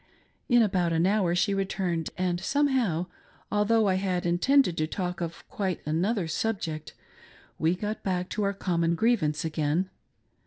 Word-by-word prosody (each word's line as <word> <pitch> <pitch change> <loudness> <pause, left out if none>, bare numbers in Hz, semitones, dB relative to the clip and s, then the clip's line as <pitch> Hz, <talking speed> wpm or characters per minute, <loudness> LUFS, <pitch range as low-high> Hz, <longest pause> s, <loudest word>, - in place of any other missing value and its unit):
In 240 -2 +6
about 180 -5 +1
an 165 +1 +2
hour 190 -3 +2
she 200 +3 +2
returned, 185 -4 -1
and 180 -1 0
somehow, 255 - +1 0.5
although 210 +1 +3
I 185 -1 +2
had 185 -2 -1
intended 180 +5 +3
to 155 - 0
talk 180 0 -3
of 170 -1 -5
quite 195 -8 -2
another 175 +5 0
subject, 160 -4 -3 0.6
we 160 +3 +2
got 210 +3 -4
back 180 -2 -1
to 215 - -3
our 200 0 +1
common 170 -3 0
grievance 165 -8 +1
again. 160 +4 0
185 Hz, 150 wpm, -27 LUFS, 170-210 Hz, 0.6 s, In